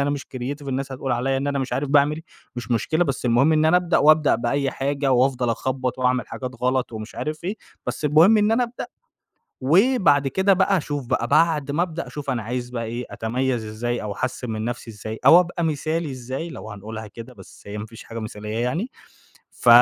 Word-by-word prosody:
أنا 140 +1 +1
مش 145 -1 -2
creative، 140 +3 -5
الناس 135 0 -3
هتقول 130 -1 -2
عليَّ 135 +3 0
إن 140 +1 -2
أنا 140 -1 0
مش 135 - -3
عارف 145 +1 -1
باعمل 150 +2 +3 0.3
مش 120 +1 -6
مشكلة، 155 +9 +1
بس 135 -4 -3
المهم 125 +6 +4
إن 155 0 +3
أنا 160 +3 +5
ابدأ 180 -1 +2
وابدأ 155 0 +5
بأي 135 +4 0
حاجة 140 0 0
وافضل 125 -1 +2
اخبّط 130 +1 -2
وأعمل 125 0 +1
حاجات 130 -1 -5
غلط 130 -1 +1
ومش 110 0 -7
عارف 155 +2 -4
إيه، 200 +4 -2 0.3
بس - - -4
المهم 160 +9 +6
إن 210 +1 +3
أنا 245 +2 +3
ابدأ، 240 +1 -7 0.8
وبعد 165 - +4
كده 190 +7 +2
بقى 195 +1 +3
أشوف 145 -5 -3
بقى 125 -2 0
بعد 150 -1 +3
ما 160 +4 +1
ابدأ 170 -1 -3
أشوف 145 -2 -5
أنا 120 -3 -1
عايز 125 +2 -4
بقى 115 -2 -3
إيه، 120 +2 -4
أتميز 120 +1 -1
إزاي 115 +3 -3
أو 105 -1 -4
أحسّن 130 +1 -3
من 110 0 -3
نَفسي 120 0 -4
إزاي، 110 +1 -7
أو 175 - +9
أبقى 175 -1 -2
مثالي 155 0 -1
إزاي 130 +6 -5
لو 110 -8 -8
هنقولها 110 +2 -7
كده، 115 +4 -10
بس 95 - -15
هي 100 +1 -6
ما 105 - -5
فيش 115 +1 -12
حاجة 115 - -7
مثالية 105 0 -5
يعني، 160 - -1 0.6
ف - - -3
135 Hz, 210 wpm, -23 LUFS, 120-155 Hz, 0.8 s, أو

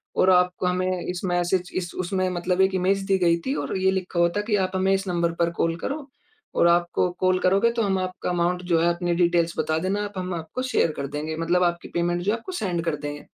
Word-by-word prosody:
और 185 - +4
आप 180 -1 +5
हमें 185 0 0
इस 180 0 -4
मैसेज 175 0 0
इस 180 -1 -3
उसमें 185 +1 0
मतलब 180 +1 0
1 190 0 +3
इमेज 190 +2 +1
दी 195 -1 +3
गई 170 -2 +3
थी 265 - 0
और - - -3
ये 190 0 +2
लिखा 185 -2 -2
हुआ 170 0 +4
था - - +2
कि 210 - +3
आप 185 - -6
हमें 190 +1 +2
इस 195 0 -1
नंबर 170 -1 0
पर 170 0 +2
कॉल 165 -1 0
करो, 285 0 -4 0.5
और - - +4
आपको 175 +1 +2
कॉल 185 0 +2
करोगे 195 +5 +3
तो - - +2
हम 195 -3 +1
आपका 185 -1 -3
अमाउंट 180 0 0
जो 165 - +4
है 170 - +3
अपनी 175 0 -1
डिटेल्स 170 -1 +2
बता 155 - 0
देना 200 +2 0
आप 205 - -8
हम 185 0 -3
आपको 170 +9 -5
शेयर 255 -10 +1
कर 140 - -3
देंगे, 150 +3 -4
मतलब 170 +2 +1
आपकी 175 -1 -1
पेमेंट 175 0 0
जो 195 +4 +1
है 225 - 0
आपको 235 +11 -9
सेंड 180 - -2
कर 165 -2 0
देंगे। 145 0 -6
180 Hz, 245 wpm, -24 LUFS, 170-190 Hz, 0.5 s, आप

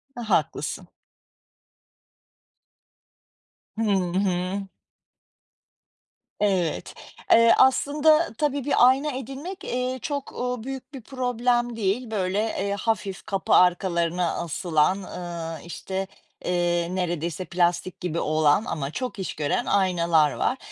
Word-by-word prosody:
Aaa, 235 -2 -6
haklısın. - - 0 2.9
Hı - - -1 0.4
hı. 190 +1 -1 1.7
Evet, 190 -6 0 0.4
eee, 230 0 +7
aslında, 300 +3 +4
tabii, 285 -3 0
bir 250 -3 +5
ayna 275 +3 +2
edinmek, 270 - -7
eee, 255 +1 -2
çok, 285 -2 -4
ııı, 250 -2 -3
büyük 265 +1 -7
bir 265 - -7
problem 245 -1 0
değil. 220 +3 -1
Böyle, 195 -1 0
eee, 200 -2 -1
hafif 205 -4 -2
kapı 195 -1 -1
arkalarına 175 -1 +3
asılan, 170 +1 +1
ııı, 170 -3 -6
işte, 190 +2 -4 0.4
eee, 175 -1 +1
neredeyse 175 0 -2
plastik 175 +1 0
gibi 170 -2 -2
olan 155 +6 +2
ama 140 -2 -3
çok 250 -2 -4
iş 190 - -3
gören 150 +10 -1
aynalar 170 -6 +3
var. 265 - -1
195 Hz, 105 wpm, -25 LUFS, 175-250 Hz, 2.9 s, eee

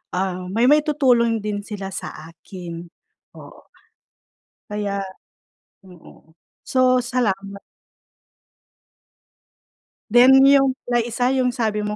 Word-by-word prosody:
um, 185 0 -2
may 230 +5 +2
maitutulong 265 -6 +2
din 205 -1 -5
sila 200 -2 -7
sa - - -6 0.2
akin. 170 0 -10 0.5
Oo, - - -16 1.0
kaya 205 -1 -3 0.8
mm, 180 -3 -18 0.3
so 255 -1 +2
salamat. 200 -5 -3 2.5
Then 260 +3 +6
'yun 275 -1 +4
palang 240 -1 -1
1 245 +2 -1
'yong 255 -2 0
sabi 220 -4 -1
mo 210 - -4
225 Hz, 95 wpm, -21 LUFS, 200-255 Hz, 2.5 s, Then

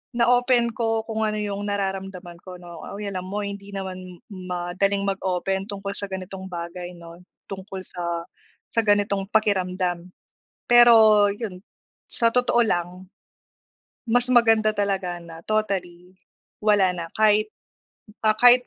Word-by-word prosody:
na-open 245 0 +3
ko 225 -1 -1
kung 220 -1 -1
ano 215 - -2
yung 205 0 -3
nararamdaman 195 -3 -4
ko, 185 -1 -8
'no. 175 -2 -11
Ay, 205 -1 -5
alam 185 -1 -5
mo, 205 +2 -3
hindi 200 0 -7
naman 185 -2 -7
madaling 185 +2 -2
mag-open 190 0 -2
tungkol 200 -1 -5
sa 200 0 -2
ganitong 190 0 -7
bagay, 175 0 -7
'no, 170 0 -12 0.3
tungkol 190 0 -7
sa 170 -2 -4 0.5
sa 230 - +1
ganitong 200 -2 +1
pakiramdam. 185 -4 0 0.6
Pero 220 -4 +7
'yun, 200 -3 -6 0.5
sa 230 -1 +4
totoo 245 -1 +3
lang, 180 -1 -2 1.0
mas 245 +2 +2
maganda 225 -3 +4
talaga 195 -3 -1
na 165 -1 -11
totally 185 -4 -2 0.5
wala 205 -3 +4
na, 170 -1 -5
kahit, 215 0 +3 0.7
ah, 215 0 +4
kahit 245 0 +6
195 Hz, 130 wpm, -24 LUFS, 180-215 Hz, 1.0 s, Pero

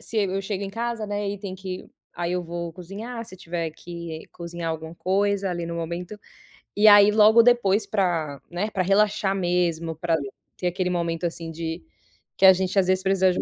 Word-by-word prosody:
se 225 - -4
eu 195 -1 0
chego 200 0 -3
em 195 - -5
casa, 230 0 -3
né, 205 0 -2
e 205 - -5
tem 195 -2 -6
que 185 -1 -7 0.3
aí 175 0 -2
eu 180 0 -1
vou 170 0 -5
cozinhar 210 +7 -7
se 205 -4 -10
tiver 170 -2 -4
que 170 0 -8
cozinhar 170 -1 -5
alguma 160 0 -6
coisa 195 +2 0
ali 175 -1 -3
no 170 - -4
momento, 175 +5 -5 0.6
e 210 +1 +5
aí 205 0 +8
logo 220 +2 +6
depois 220 -4 +3
pra, 165 -8 -1
né, 190 +5 -2
pra 190 - 0
relaxar 200 +1 +2
mesmo, 175 -3 0
pra 165 +1 0 0.4
ter 180 - -1
aquele 180 +1 -1
momento, 170 -1 -1
assim, 165 -1 -4
de 165 +1 -5 0.5
que 195 - +5
a 190 - +10
gente 190 +1 -2
às 185 - +2
vezes 185 0 +2
precisa 190 -1 +3
de - - -3
um - - +1
185 Hz, 200 wpm, -24 LUFS, 170-200 Hz, 0.6 s, a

